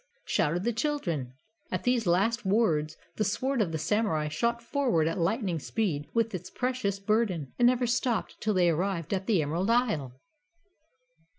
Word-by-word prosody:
shouted 170 +3 +1
the 240 +2 0
children. 190 - -2 0.4
At 185 0 -2
these 245 -4 +1
last 200 +8 +2
words 185 -7 +1 0.2
the 215 - +2
sword 255 +5 0
of 180 -6 0
the 160 - -1
Samurai 160 -4 0
shot 235 +10 0
forward 235 - +1
at 165 +3 -2
lightning 185 -1 0
speed 150 -5 -2
with 230 -2 0
its 185 - -5
precious 250 -6 -2
burden, 195 - 0
and 240 - +6
never 250 0 +3
stopped 240 0 -1
till 215 -1 0
they 175 -2 +4
arrived 175 0 -1
at 190 -1 -2
the 195 -8 +3
Emerald 170 +8 -1
Isle. 160 - +1
200 Hz, 165 wpm, -28 LUFS, 165-235 Hz, 0.4 s, and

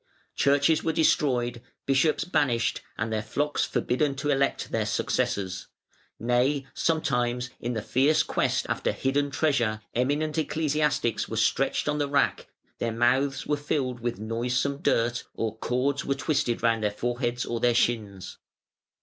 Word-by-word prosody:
Churches 145 +3 +3
were 160 - 0
destroyed, 125 -7 +1 0.2
bishops 140 +3 +2
banished, 130 -9 +1 0.2
and 110 0 -2
their 110 - 0
flocks 145 +7 -1
forbidden 140 +3 0
to 145 +2 -1
elect 140 0 0
their - - 0
successors: 95 -2 -1 0.5
nay, 125 +4 +1
sometimes, 125 -6 0
in 120 +1 -3
the 110 -2 -3
fierce 140 +7 +3
quest - - 0
after - - -1
hidden 140 +2 0
treasure, 135 -7 +1
eminent 150 +6 0
ecclesiastics 150 -6 0
were - - -4
stretched - - +1
on 150 0 0
the 145 -1 0
rack, 140 0 +1 0.3
their 115 - -1
mouths 130 +4 +1
were 150 - +1
filled 135 -4 -2
with 120 0 -3
noisome 120 +6 -1
dirt, 120 -1 +1
or 110 -1 -2
cords 135 +4 0
were 140 - -1
twisted 135 -4 -1
round 115 -1 +2
their 105 - +2
foreheads 120 +2 -2
or 120 - -3
their 120 0 +3
shins. 105 -6 -1
130 Hz, 145 wpm, -27 LUFS, 120-145 Hz, 0.5 s, Churches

